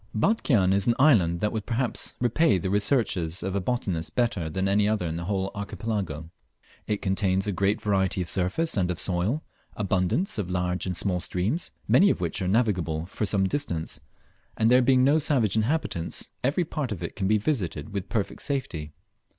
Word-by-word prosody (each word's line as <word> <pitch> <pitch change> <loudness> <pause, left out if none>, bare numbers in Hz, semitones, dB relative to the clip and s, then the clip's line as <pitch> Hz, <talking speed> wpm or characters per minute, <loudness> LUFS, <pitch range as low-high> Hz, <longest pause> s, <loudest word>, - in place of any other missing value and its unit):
Batchian 110 - +2
is 100 -1 +1
an 120 - +4
island 95 - +4
that 105 - +1
would 110 -3 -4
perhaps 120 +1 -1
repay 125 - +3
the 95 +1 -2
researches 100 - +1
of 95 +1 -2
a 100 - 0
botanist 90 -6 -2
better 110 -10 0
than 95 +4 -1
any 100 +1 +3
other 110 -4 0
in 80 -1 -3
the 85 +1 -4
whole 95 0 -1
Archipelago. 100 -6 -4 0.6
It 105 -1 -2
contains 95 -1 +1
a 105 - 0
great 100 +3 +1
variety 95 -3 0
of 90 - -2
surface 95 - 0
and 90 -4 +1
of 90 - -3
soil, 95 - 0 0.3
abundance 100 - 0
of 95 -3 -3
large 90 0 -1
and 90 -1 -2
small 90 -1 +1
streams, 95 - -1 0.2
many 200 - +6
of - - 0
which 90 +3 -2
are 90 - -1
navigable 90 -7 +1
for 100 +3 -3
some 100 -1 +2
distance, 85 - -2 0.6
and 110 +1 +3
there 125 +1 +6
being 130 0 +4
no 145 +4 +4
savage 130 -10 +2
inhabitants, 110 - -1
every 145 +7 +1
part 150 -6 -3
of 90 -5 -4
it 85 - -5
can 95 - -1
be 110 +2 +4
visited 100 - -2
with 100 -1 -4
perfect 110 -5 -2
safety. 85 - -3
100 Hz, 190 wpm, -26 LUFS, 90-120 Hz, 0.6 s, many